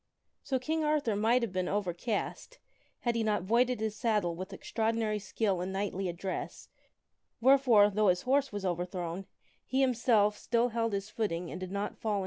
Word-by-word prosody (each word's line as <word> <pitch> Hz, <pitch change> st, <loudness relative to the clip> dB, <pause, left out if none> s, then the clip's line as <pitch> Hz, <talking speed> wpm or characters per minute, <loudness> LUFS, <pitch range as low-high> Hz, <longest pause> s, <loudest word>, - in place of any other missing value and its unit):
So 265 Hz, -, -1 dB
King 315 Hz, +5 st, -1 dB
Arthur 300 Hz, -8 st, +1 dB
might 230 Hz, +4 st, +3 dB
have 230 Hz, -, -2 dB
been 185 Hz, -1 st, -1 dB
overcast, 205 Hz, -, -3 dB, 0.4 s
had 240 Hz, -, +1 dB
he 230 Hz, -1 st, 0 dB
not 210 Hz, -4 st, 0 dB
voided 240 Hz, +4 st, +2 dB
his 220 Hz, -1 st, -2 dB
saddle 210 Hz, -6 st, +1 dB
with 185 Hz, +3 st, -7 dB
extraordinary 220 Hz, +1 st, -1 dB
skill 195 Hz, -2 st, -1 dB
and 185 Hz, +1 st, -3 dB
knightly 195 Hz, -1 st, -2 dB
address, 180 Hz, +2 st, -5 dB, 0.7 s
wheretore, 240 Hz, -5 st, +5 dB
though 210 Hz, +1 st, +2 dB
his 180 Hz, -1 st, +2 dB
horse 275 Hz, +1 st, +2 dB
was 205 Hz, -1 st, -5 dB
King 190 Hz, -, +1 dB
Arthur 175 Hz, 0 st, -3 dB
overthrown, 180 Hz, 0 st, -4 dB, 0.4 s
he 265 Hz, +2 st, 0 dB
himself 230 Hz, -5 st, +3 dB
still 235 Hz, +1 st, +1 dB
held 230 Hz, -1 st, -1 dB
his 200 Hz, +1 st, -3 dB
footing 180 Hz, -6 st, -2 dB
and -, -, -6 dB
did 185 Hz, -1 st, -5 dB
not 200 Hz, +1 st, -3 dB
fall 220 Hz, -2 st, -1 dB
is -, -, +1 dB
overthrown. -, -, 0 dB
210 Hz, 190 wpm, -31 LUFS, 190-235 Hz, 0.7 s, wheretore